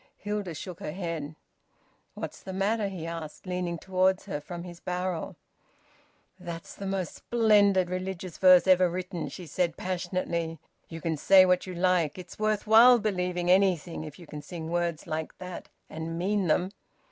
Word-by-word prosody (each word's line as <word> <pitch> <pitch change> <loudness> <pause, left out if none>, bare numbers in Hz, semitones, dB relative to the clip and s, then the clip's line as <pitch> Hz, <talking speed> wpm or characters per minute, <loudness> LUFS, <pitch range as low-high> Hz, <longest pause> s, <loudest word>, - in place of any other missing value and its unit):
Hilda 205 -5 -4
shook 175 +3 -7
her 150 - -5
head. 165 -5 -4 0.8
"What's - - -6
the 190 - -7
matter?" 205 +3 0
he 185 -4 -6
asked, 165 -1 -7
leaning 180 -2 -2
towards 185 +1 +1
her 150 -7 -4
from 170 +3 -7
his 175 -1 -10
barrel. 180 -2 -3 1.0
"That's 170 -2 -7
the 200 - -6
most 190 -2 -2
splendid 205 -5 +3
religious 185 -1 -5
verse 185 -1 +7
ever 185 -1 +5
written!" 180 -1 -4
she 180 - -9
said 170 +1 -1
passionately. 175 -2 -2 0.3
"You 165 -1 -7
can 160 -1 -1
say 190 +5 +7
what 180 0 +2
you 185 - -6
like. 175 -3 +1
It's 180 +1 -10
worth 215 -1 0
while 230 +3 +8
believing 180 -4 0
anything, 185 -4 +2
if 150 -2 -9
you 175 - -12
can 150 -1 -8
sing 160 +2 -7
words 170 -2 -1
like 155 0 -4
that 180 -1 -8 0.2
and 160 +1 -5
mean 195 +2 0
them!" 180 +4 +1
180 Hz, 165 wpm, -28 LUFS, 170-190 Hz, 1.0 s, while